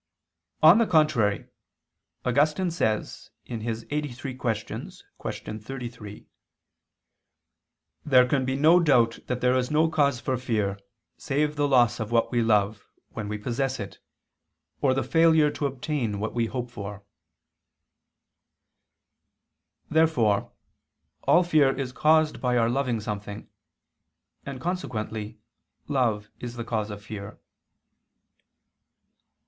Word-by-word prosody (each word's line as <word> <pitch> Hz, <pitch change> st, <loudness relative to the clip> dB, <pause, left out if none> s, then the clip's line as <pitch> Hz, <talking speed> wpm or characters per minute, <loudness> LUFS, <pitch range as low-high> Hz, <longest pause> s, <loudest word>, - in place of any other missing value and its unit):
On 165 Hz, +8 st, +8 dB
the 230 Hz, -, +3 dB
contrary, 150 Hz, -, +2 dB, 0.8 s
Augustine 150 Hz, +7 st, +2 dB
says 110 Hz, -10 st, -2 dB, 0.2 s
(QQ. 115 Hz, -1 st, -4 dB
83, 140 Hz, -3 st, -3 dB
qu. 110 Hz, -2 st, -5 dB
33): 115 Hz, -3 st, -8 dB, 1.8 s
"There 130 Hz, -4 st, +5 dB
can 135 Hz, 0 st, +1 dB
be 130 Hz, +1 st, -1 dB
no 160 Hz, +5 st, +5 dB
doubt 125 Hz, -8 st, +3 dB
that 125 Hz, -1 st, -2 dB
there 125 Hz, 0 st, +3 dB
is 125 Hz, -1 st, 0 dB
no 155 Hz, +2 st, +3 dB
cause 140 Hz, -5 st, +2 dB
for 130 Hz, +1 st, -1 dB
fear 105 Hz, -5 st, -1 dB, 0.4 s
save 150 Hz, +2 st, -1 dB
the 145 Hz, 0 st, +1 dB
loss 120 Hz, -3 st, +3 dB
of 110 Hz, 0 st, -4 dB
what 115 Hz, -1 st, +2 dB
we 120 Hz, -2 st, +2 dB
love, 105 Hz, -2 st, +1 dB, 0.2 s
when 105 Hz, -2 st, -6 dB
we 105 Hz, +1 st, -3 dB
possess 125 Hz, +5 st, -2 dB
it, 100 Hz, -1 st, -7 dB, 0.8 s
or 130 Hz, -2 st, +3 dB
the 135 Hz, -, 0 dB
failure 160 Hz, +2 st, +4 dB
to 145 Hz, -, -2 dB
obtain 130 Hz, -5 st, -3 dB
what 110 Hz, +2 st, -3 dB
we 115 Hz, -1 st, 0 dB
hope 125 Hz, 0 st, -5 dB
for." 100 Hz, -2 st, -7 dB, 2.8 s
Therefore 150 Hz, -11 st, +2 dB, 0.7 s
all 175 Hz, -, +5 dB
fear 150 Hz, -6 st, +3 dB
is 135 Hz, -2 st, -3 dB
caused 155 Hz, +3 st, +2 dB
by 125 Hz, -1 st, +1 dB
our 115 Hz, -1 st, +3 dB
loving 125 Hz, -3 st, 0 dB
something: 105 Hz, -1 st, -6 dB, 1.0 s
and 135 Hz, -2 st, -5 dB
consequently 110 Hz, -, -4 dB, 0.5 s
love 115 Hz, -7 st, 0 dB
is 120 Hz, -1 st, -6 dB
the 120 Hz, -, -4 dB
cause 110 Hz, -2 st, -2 dB
of 105 Hz, 0 st, -8 dB
fear. 100 Hz, 0 st, -8 dB
125 Hz, 120 wpm, -26 LUFS, 110-145 Hz, 2.8 s, On